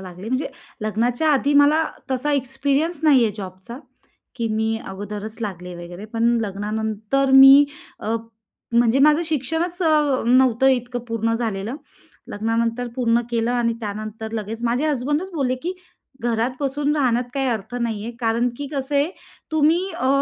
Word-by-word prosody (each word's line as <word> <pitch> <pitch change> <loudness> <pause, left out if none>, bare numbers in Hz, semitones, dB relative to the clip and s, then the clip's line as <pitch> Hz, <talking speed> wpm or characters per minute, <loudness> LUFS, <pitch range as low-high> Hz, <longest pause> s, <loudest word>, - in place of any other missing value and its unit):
लागले 185 +2 -9
म्हणजे 260 +4 -1 0.4
लग्नाच्या 240 +8 0
आधी 280 +1 +2
मला 295 +3 +5 0.3
तसा 265 +3 0
एक्सपिरियन्स 280 +4 0
नाही 285 -5 +5
आहे 215 - 0
जॉबचा 190 +5 -8 0.6
की 230 -2 -1
मी 220 0 0
अगोदरच 205 +2 -6
लागले 180 -4 -5
वगैरे. 175 +3 -9
पण 225 +1 -2 0.2
लग्नानंतर 220 +5 -1
मी 270 +2 +9 0.3
अ, 220 +2 -2 0.6
म्हणजे 235 +2 +4
माझं 300 +3 +5
शिक्षणच 325 +4 -2
अ, 300 -5 +2
नव्हतं 255 0 +4
इतकं 245 -1 0
पूर्ण 230 0 0
झालेलं. 225 +1 -3 0.5
लग्नानंतर 230 +3 -1
पूर्ण 235 -2 +2
केलं 230 0 0
आणि 235 -1 +1
त्यानंतर 215 +1 -6
लगेच 225 +1 -5
माझे 240 +5 +1
हसबंडच 295 +6 -1
बोलले 265 -5 0
की 350 +3 -2 0.5
"घरात 235 +1 0
बसून 285 +1 0
राहण्यात 250 -4 +2
काही 270 -1 0
अर्थ 220 -1 -3
नाही 230 -4 -2
आहे, 235 - -4
कारण 230 +1 +1
की 285 - -5
कसं 275 0 -3
आहे, 285 +4 +2 0.4
तुम्ही 320 +5 +3
अ, 260 - 0
240 Hz, 150 wpm, -22 LUFS, 220-280 Hz, 0.6 s, मी